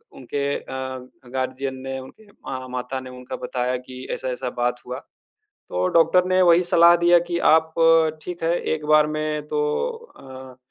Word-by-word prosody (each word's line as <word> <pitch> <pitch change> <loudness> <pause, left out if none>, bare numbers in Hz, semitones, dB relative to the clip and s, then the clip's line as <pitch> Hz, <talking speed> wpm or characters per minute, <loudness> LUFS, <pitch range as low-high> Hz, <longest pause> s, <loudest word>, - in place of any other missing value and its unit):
उनके 140 0 -3
अ, 130 0 -5 0.3
गार्डियन 130 +1 -3
ने 135 0 -3
उनके 205 +11 -14 0.4
माता 125 +1 -4
ने 130 0 -9
उनका 125 0 -8
बताया 125 0 -2
कि 130 +1 -10
ऐसा-ऐसा 130 -1 -3
बात 125 0 0
हुआ। 125 +2 -5 0.7
तो 90 +1 -1
डॉक्टर 180 +3 +4
ने 185 0 +3
वही 175 0 +5
सलाह 170 0 +6
दिया 175 0 +5
कि 170 -1 -1
आप 160 0 +3 0.5
ठीक 175 -2 -7
है 170 +1 +1
एक 155 -1 -2
बार 155 0 +5
में 155 0 -3
तो 150 - -1 0.6
अ, 130 -1 -11
135 Hz, 155 wpm, -23 LUFS, 130-160 Hz, 0.7 s, सलाह